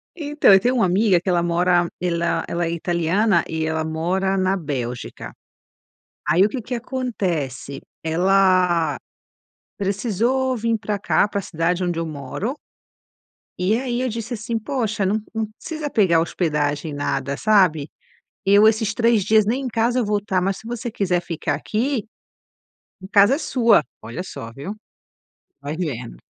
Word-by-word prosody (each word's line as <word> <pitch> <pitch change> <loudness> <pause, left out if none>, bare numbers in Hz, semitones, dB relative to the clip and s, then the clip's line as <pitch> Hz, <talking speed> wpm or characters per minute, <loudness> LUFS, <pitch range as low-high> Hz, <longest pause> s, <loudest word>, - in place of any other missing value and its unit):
Então, 295 - +3
eu 195 - +8
tenho 245 +6 +1
uma 225 -6 +3
amiga 190 0 +3
que 190 - -3
ela 175 -1 +2
mora, 175 0 +2
ela 170 -1 0
ela 170 0 -1
é 165 - -2
italiana, 170 +3 +1
e 160 0 -2
ela 160 0 -1
mora 180 +5 -1
na 190 0 +2
Bélgica, 130 -8 -5 0.9
aí 170 +6 +5
o - - +1
que 250 - -4
que 245 +3 -4
acontece, 185 - -3 0.2
ela 180 0 +3 0.8
precisou 235 +6 0
vim 230 0 0
pra 210 -1 -3
cá 200 - +2
pra 200 - -2
a - - -10
cidade 175 +2 -1
onde 175 -2 -1
eu 165 - -2
moro 155 - -4 1.1
e 200 +6 +2
aí 250 -1 -2
eu 255 - 0
disse, 230 +1 -5
assim: 225 +2 -3
"Poxa 220 -4 -1
num 210 +3 +1
num 225 -1 -1
precisa 310 +5 -5
pegar 190 -10 +3
a - - +5
hospedagem 150 -3 -1
nada, 145 -1 -2
sabe, 180 -8 +3 0.6
eu 205 +2 +6
esses 220 -1 +1
3 230 -2 +3
dias 215 +1 +4
nem 245 +5 0
em - - -2
casa 235 +1 +1
eu 240 - 0
vou 205 0 +1
tá, 190 -2 -1
mas 195 +1 0
se 220 - -11
você 240 0 -4
quiser 180 -4 0
ficar 165 -3 -2
aqui, 225 - -2 1.0
a - - -7
casa 205 +6 +6
é - - -2
sua". 235 - +3 0.2
Olha 115 +11 -6
só 115 -10 -8
viu, 145 - -6 0.9
vai 145 +2 -4
vendo. 125 - -5
195 Hz, 165 wpm, -22 LUFS, 165-225 Hz, 1.1 s, eu